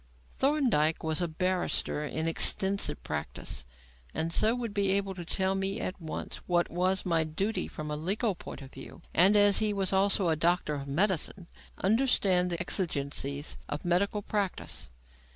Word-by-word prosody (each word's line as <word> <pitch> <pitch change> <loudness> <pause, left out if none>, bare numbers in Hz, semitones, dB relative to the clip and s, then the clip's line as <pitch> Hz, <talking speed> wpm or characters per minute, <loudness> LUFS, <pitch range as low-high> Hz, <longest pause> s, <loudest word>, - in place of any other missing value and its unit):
Thorndyke 245 - +2
was 160 +2 -1
a 175 - +1
barrister 180 -2 0
in 160 +2 -2
extensive 190 +4 +1
practice, 65 0 -4 0.5
and 165 +1 -1
so 220 +6 +4
would 235 -4 -4
be 200 -2 +2
able 195 -1 0
to 180 -2 -7
tell 190 +3 0
me 195 +1 -1
at 185 0 -4
once 160 - -5
what 175 -1 +1
was 185 +2 +1
my 165 -3 +2
duty 195 +8 -2
from 150 -1 -6
a - - -1
legal 195 +8 0
point 160 - -9
of 135 - -12
view; 135 - -11
and, 190 +5 +6
as 205 -1 +6
he 215 -1 +1
was 195 -1 0
also 195 -1 +3
a 160 - +3
doctor 170 -1 +1
of 140 -1 -5
medicine, 185 +3 +1
he - - -21 0.2
would - - -4
understand 195 -5 +3
the 170 -1 -2
exigencies 145 -5 -2
of 145 +3 -4
medical 200 +4 +1
practice. 200 - -3
180 Hz, 170 wpm, -29 LUFS, 160-200 Hz, 0.5 s, and